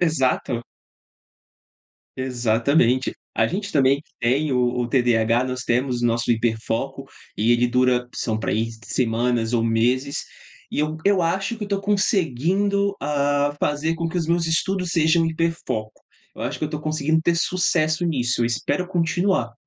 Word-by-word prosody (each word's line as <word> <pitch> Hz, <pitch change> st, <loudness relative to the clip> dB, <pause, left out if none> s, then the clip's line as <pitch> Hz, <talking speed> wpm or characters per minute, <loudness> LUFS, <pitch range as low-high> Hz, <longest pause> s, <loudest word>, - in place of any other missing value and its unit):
Exato. 130 Hz, -6 st, +1 dB, 1.5 s
Exatamente! 125 Hz, +1 st, +1 dB, 0.2 s
A -, -, +3 dB
gente 200 Hz, +2 st, -3 dB
também 140 Hz, -1 st, +3 dB
que -, -, -35 dB
tem 135 Hz, +5 st, +1 dB
o 125 Hz, -, +2 dB, 0.2 s
o 120 Hz, -, -1 dB
TDAH 120 Hz, -1 st, +2 dB
nós 130 Hz, -1 st, -4 dB
temos 125 Hz, 0 st, 0 dB
o -, -, +3 dB
nosso 115 Hz, +1 st, 0 dB
hiper 115 Hz, -1 st, +1 dB
foco, 115 Hz, -, -3 dB, 0.3 s
e 115 Hz, +3 st, +3 dB
ele 120 Hz, +1 st, +3 dB
dura 125 Hz, 0 st, +2 dB
são 110 Hz, -2 st, -2 dB
pra -, -, -2 dB
aí 115 Hz, +2 st, 0 dB, 0.2 s
semanas 120 Hz, -1 st, 0 dB
ou 115 Hz, -1 st, +2 dB
meses 125 Hz, +5 st, 0 dB, 0.5 s
e -, -, -4 dB
eu 155 Hz, +1 st, -1 dB
eu 200 Hz, -2 st, +3 dB
acho 195 Hz, +7 st, -1 dB
que 215 Hz, -, -5 dB
eu 205 Hz, -, -9 dB
tô 200 Hz, -1 st, -1 dB
conseguindo, 200 Hz, -, +1 dB
hã, 145 Hz, 0 st, +1 dB
fazer 150 Hz, +2 st, 0 dB
com 165 Hz, 0 st, -2 dB
que 175 Hz, +2 st, -2 dB
os 165 Hz, -, -2 dB
meus 170 Hz, 0 st, +1 dB
estudos 180 Hz, +2 st, 0 dB
sejam 165 Hz, 0 st, +3 dB
hiper 165 Hz, +1 st, 0 dB
foco. 110 Hz, 0 st, -4 dB, 0.3 s
Eu -, -, -7 dB
acho -, -, -3 dB
que -, -, -2 dB
eu 155 Hz, -, -4 dB
tô 150 Hz, -, -4 dB
conseguindo 155 Hz, +1 st, 0 dB
ter 170 Hz, +1 st, +2 dB
sucesso 170 Hz, -2 st, +1 dB
nisso. 125 Hz, -6 st, 0 dB
Eu 115 Hz, -, +2 dB
espero 120 Hz, +9 st, -1 dB
continuar. 175 Hz, -, 0 dB
145 Hz, 170 wpm, -22 LUFS, 120-170 Hz, 1.5 s, A